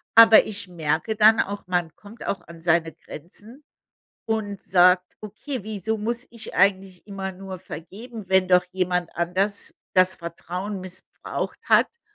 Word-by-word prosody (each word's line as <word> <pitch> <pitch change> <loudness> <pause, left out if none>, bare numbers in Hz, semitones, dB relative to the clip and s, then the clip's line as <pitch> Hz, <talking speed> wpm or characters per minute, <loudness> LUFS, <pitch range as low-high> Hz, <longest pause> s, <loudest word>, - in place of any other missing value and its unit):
Aber 225 -1 +9
ich 205 -2 -4
merke 165 +5 -1
dann 220 +1 +6
auch, 200 -1 -2
man 175 -4 -1
kommt 215 +3 -12
auch 200 - -2
an 170 -1 -12
seine 165 -1 +2
Grenzen 210 - -12 0.6
und 210 -3 -3
sagt: 180 0 +4
„Okay, 215 +4 -6
wieso 215 +1 -3
muss 235 +3 -2
ich 230 -2 -10
eigentlich 190 -1 +1
immer 195 -1 -5
nur 190 0 -8
vergeben, 205 +7 -9
wenn 190 -1 +4
doch 180 -1 +5
jemand 180 -2 -1
anders 190 +4 -1 0.2
das 185 0 +4
Vertrauen 180 +4 -6
missbraucht 185 0 -6
hat 470 - +3
190 Hz, 145 wpm, -24 LUFS, 180-215 Hz, 0.6 s, Aber